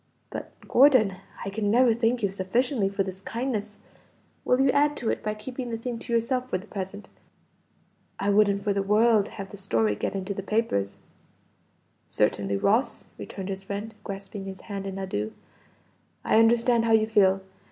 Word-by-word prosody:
But - - -6 0.2
Gordon, 250 -8 +5 0.3
I 195 - -3
can 205 0 -1
never 240 +2 +5
thank 235 0 0
you 200 - +3
sufficiently 200 +4 0
for 195 0 0
this 190 0 -7
kindness; 220 -2 -3 0.7
will 250 - +2
you 270 0 +4
add 290 +1 +2
to 235 - -1
it - - -3
by 215 0 -2
keeping 245 +3 -6
the 230 - -3
thing 235 0 -4
to 240 - -8
yourself 250 +2 0
for 185 - 0
the 185 - -11
present? 200 0 -6 1.1
I 200 +1 +1
wouldn't 200 -1 +3
for 205 -1 +1
the 200 - 0
world 210 +1 +4
have 195 -2 -8
the 205 - -9
story 115 - +1
get 105 - -3
into 195 +1 -3
the 195 - -4
papers." 195 - -1 1.1
"Certainly, 100 0 0
Ross!" 220 - +1
returned 195 -1 -6
his 195 0 -4
friend, 205 +3 -5
grasping 195 0 -7
his 190 -1 -8
hand 200 -2 -5
in 195 0 -5
adieu. 110 - -3 0.9
"I 220 - +4
understand 230 +1 +4
how 225 - +3
you 220 -1 +5
feel. 195 -3 +3
210 Hz, 175 wpm, -26 LUFS, 195-230 Hz, 1.1 s, Gordon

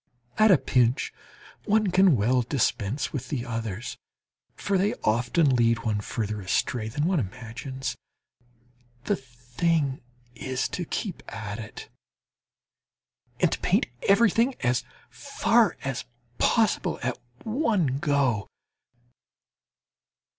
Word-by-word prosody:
At 215 0 +7
a 185 - +7
pinch 125 0 +1 0.5
one 210 -2 +2
can 185 -3 +5
well 125 +5 +2
dispense 120 -1 -1
with 130 -3 -4
the 125 -4 -2
others, 115 -2 -4 0.6
for 200 - -1
they 195 +3 +2
often 125 +6 +2
lead 115 -1 +2
one 105 -2 +1
further 105 0 -3
astray 110 +4 -1
than 145 +7 -1
one 180 -1 +2
imagines. 125 +4 -5 1.1
The - - +1
thing 130 +4 -1 0.3
is 130 +2 -2
to 180 - -4
keep 190 +1 -4
at 105 -1 -5
it, 105 -1 -8 1.5
and - - +3
to - - -2
paint - - +2 0.2
everything 230 +5 +4
as 120 +1 +1 0.3
far 235 -5 +2
as 135 -2 -3 0.3
possible 225 -4 +2
at 125 0 -2 0.2
one 215 - +1
go! 140 - +1
130 Hz, 110 wpm, -26 LUFS, 115-180 Hz, 1.5 s, At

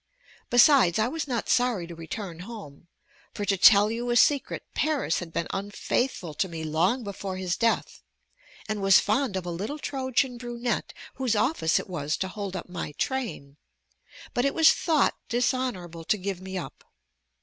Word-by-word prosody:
Besides, 245 - +6
I 220 +1 +2
was 315 +3 -4
not 245 -4 -2
sorry 245 -8 +2
to 170 - -9
return 165 +1 -7
home: 180 -7 -10 0.5
for 205 - -3
to 200 - +2
tell 205 +2 +6
you 240 +2 -3
a 240 - +1
secret, 280 +3 +3
Paris 300 - 0
had 175 -2 -7
been 165 - -2
unfaithful 200 - -2
to 190 - -1
me 165 -1 -6
long 170 +11 +1
before 195 -2 -5
his 185 -2 -1
death, 230 -1 0 0.7
and 215 -1 -3
was 195 -1 +6
fond 220 0 0
of 185 - -4
a 175 - -3
little 205 - -4
Trojan 260 -3 -1
brunette 240 0 -3 0.3
whose 255 -4 0
office 210 - +2
it - - -3
was 150 -5 -2
to 190 - -2
hold 200 -1 -5
up 180 - -5
my 175 -4 -5
train; 215 - -3 0.8
but 245 - +1
it 275 +1 0
was 320 -1 +7
thought 315 -4 +2
dishonorable 240 -9 -1
to 215 - +2
give 190 -1 -4
me 190 0 -6
up. 150 -8 -7
205 Hz, 170 wpm, -26 LUFS, 175-245 Hz, 0.8 s, was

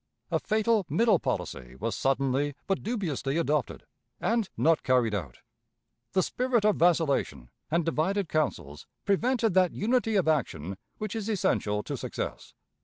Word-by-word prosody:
A - - +2
fatal 220 0 +2
middle 200 +5 +3
policy 60 0 -4
was - - -3
suddenly 135 +1 0
but 195 -1 -1
dubiously 170 - -2
adopted, 150 -6 -1 0.4
and 225 -4 0
not 165 0 +3
carried 125 -4 +2
out. 80 -12 -5 0.7
The 185 0 +3
spirit 245 -1 0
of 210 - +3
vacillation 160 - +1 0.2
and 170 +1 +1
divided 170 +4 0
counsels 85 - -2 0.2
prevented 225 +1 +2
that 185 -1 +3
unity 225 +1 +1
of 190 -5 +2
action 95 - -1 0.2
which 215 -1 -4
is 220 -1 -3
essential 105 - 0
to - - -4
success. - - -5
170 Hz, 140 wpm, -28 LUFS, 135-215 Hz, 0.7 s, middle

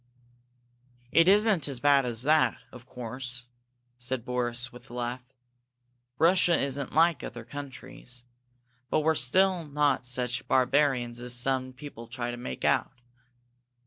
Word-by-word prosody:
"It 165 +1 +5
isn't 200 -5 +4
as 135 -3 -3
bad 140 -1 +4
as 120 0 -1
that, 155 +2 +3
of 125 0 -13
course," 125 0 -6 0.5
said 125 -1 -3
Boris, 125 -1 -2
with 125 - -14
a 120 - -9
laugh. 120 +1 -3 1.0
"Russia 175 +2 +4
isn't 140 -1 -2
like 165 -1 +4
other 120 -1 -7
countries, 130 -2 -9 0.7
but - - +2
we're 160 +1 +2 0.5
not 145 -3 0
such 125 0 -2
barbarians 130 -2 +2
as 125 0 +2
some 130 +1 +1
people 125 -3 -10
try 120 0 -4
to 120 - -6
make 65 - -5
out. - - +2
130 Hz, 130 wpm, -28 LUFS, 120-145 Hz, 1.0 s, It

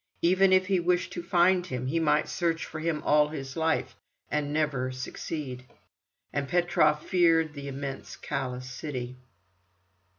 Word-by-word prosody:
Even 185 +2 +5
if 185 0 +5
he 190 -1 +2
wished 180 +1 0
to 175 - -4
find 175 +1 +3
him, 125 -5 -4
he 155 +6 0
might 150 -1 +2
search 165 -2 -1
for 155 - -7
him 155 -1 -1
all 150 0 +5
his 135 -3 -6
life, 160 -1 0 0.4
and 150 -1 -1
never 145 -4 0
succeed. 130 0 -5 0.7
And 140 -1 -1
Petrov 155 -3 +2
feared 165 -4 +3
the 140 -1 -7
immense, 140 0 -6
callous 130 -2 -4
city. 125 -1 -5
150 Hz, 145 wpm, -28 LUFS, 135-170 Hz, 0.7 s, Even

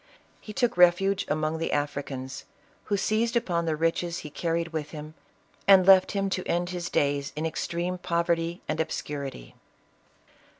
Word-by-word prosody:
He 215 - -9
took 245 +1 0
refuge 180 +3 +4
among 155 +1 -1
the 165 - -2
Africans, 140 -2 -3 0.4
who 205 - 0
seized 225 +4 0
upon 175 -8 0
the 160 - +1
riches 165 +2 0
he 150 - -7
carried 165 +1 -1
with 155 -2 -4
him, 155 0 -8 0.5
and 190 -2 +7
left 190 -1 +6
him 195 -1 0
to 185 - -2
end 175 +1 0
his 175 -1 -4
days 140 -1 0
in 155 +2 -2
extreme 170 +3 -2
poverty 170 0 -1
and 155 +1 -2
obscurity. 140 - -4
170 Hz, 155 wpm, -27 LUFS, 155-185 Hz, 0.5 s, and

